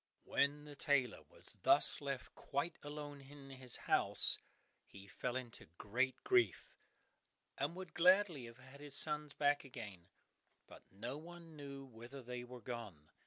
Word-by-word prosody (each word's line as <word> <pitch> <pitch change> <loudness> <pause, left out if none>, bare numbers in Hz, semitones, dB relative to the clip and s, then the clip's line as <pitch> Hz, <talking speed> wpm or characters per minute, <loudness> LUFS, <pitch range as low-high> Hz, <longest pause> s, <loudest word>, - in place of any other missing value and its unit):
When 145 +1 +1
the 145 -1 -9
tailor 135 -4 +2
was - - -18
thus - - +5
left 140 -2 -4
quite 145 +5 -2
alone 145 -1 -6
in 135 0 -12
his 130 -2 0
house - - +5 0.5
he 100 0 -12
fell 120 +5 -3
into 125 -3 -5
great 125 +5 +1
grief, 370 -2 +3 0.8
and 170 - -1
would 185 -2 -7
gladly 180 -6 +5
have 115 0 -11
had 130 +2 -14
his 145 -1 -7
sons 150 -1 -2
back 145 0 +3
again, 105 -10 -8 0.6
but - - -15
no 120 +9 -5
one 170 0 -11
knew 140 -2 -7
whither 125 +2 -10
they 125 0 -5
were 125 0 -9
gone. 105 -11 -7
135 Hz, 150 wpm, -39 LUFS, 120-150 Hz, 0.8 s, thus